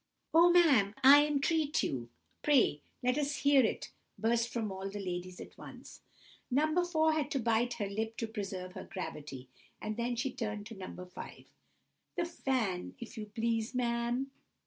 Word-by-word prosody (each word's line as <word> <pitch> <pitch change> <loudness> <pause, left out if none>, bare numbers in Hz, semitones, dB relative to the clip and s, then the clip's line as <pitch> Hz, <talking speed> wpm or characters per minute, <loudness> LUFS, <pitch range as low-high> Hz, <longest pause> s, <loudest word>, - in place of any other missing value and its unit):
"Oh, 335 +2 +7
ma'am, 280 - +5
I 290 +2 +9
entreat 300 +1 +1
you—pray 145 - 0 0.2
let 250 +3 +2
us 290 0 0
hear 280 -2 +6
it!" 220 - -2 0.3
burst 230 +1 +1
from 225 -4 -2
all 190 +1 -5
the 205 +1 -6
ladies 180 -1 -5
at - - -10
once. - - -11 0.5
No. 310 +6 +2
4 315 -2 +2
had 305 -2 -1
to 285 -3 -1
bite 235 +1 +1
her 205 -4 -3
lip 220 +3 -3
to 225 - -1
preserve 195 -4 -5
her - - -7
gravity, 150 - -6 0.3
and 215 0 -4
then 240 +1 -1
she 250 +3 -1
turned 210 -3 -4
to 225 +1 -9
No. 190 -1 -7
5— 180 0 -9 0.7
"The 345 - 0
fan, 255 - -2
if 235 +1 -8
you 215 -2 -6
please, 225 +2 -1
ma'am!" 240 +2 0
235 Hz, 165 wpm, -32 LUFS, 200-280 Hz, 0.7 s, I